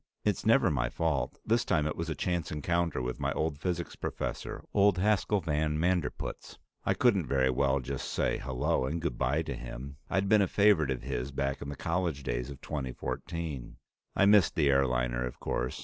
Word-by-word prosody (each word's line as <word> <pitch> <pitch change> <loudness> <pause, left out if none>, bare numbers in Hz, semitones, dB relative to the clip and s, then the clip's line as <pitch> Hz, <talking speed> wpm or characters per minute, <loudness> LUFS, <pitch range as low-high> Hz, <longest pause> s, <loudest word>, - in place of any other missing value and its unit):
It's - - 0
never - - +5
my 65 -3 0
fault; 80 -2 -1
this 115 +2 +2
time 75 -10 +1
it 75 - -1
was 85 0 -3
a 80 - -2
chance 85 -4 -1
encounter 85 -1 0
with 60 0 -3
my - - 0
old 80 -2 -1
physics 85 0 -2
professor, - - -4
old 100 -2 +4
Haskel 105 +1 +2
van 75 -1 0
Manderpootz. 90 0 -2 0.3
I - - +1
couldn't - - +3
very 65 -1 +2
well 70 +1 +2
just 65 - -4
say - - 0
hello 65 0 0
and 80 +5 -2
good 80 -7 -3
bye 75 +6 +1
to 80 - -4
him; 65 +3 -7
I'd 100 0 +1
been 105 +1 +5
a 95 - +3
favorite 100 -9 +4
of 65 -2 -2
his 60 +3 -3
back 70 0 -2
in 70 - -5
the 70 - -5
college 85 -3 -1
days - - -2
of 70 -1 -9
2014. 75 +1 -4 0.4
I 100 - +4
missed 100 -3 +5
the 75 -3 +4
airliner, 60 -2 +1
of 60 - -5
course. 65 +2 -2
75 Hz, 195 wpm, -30 LUFS, 65-85 Hz, 0.4 s, never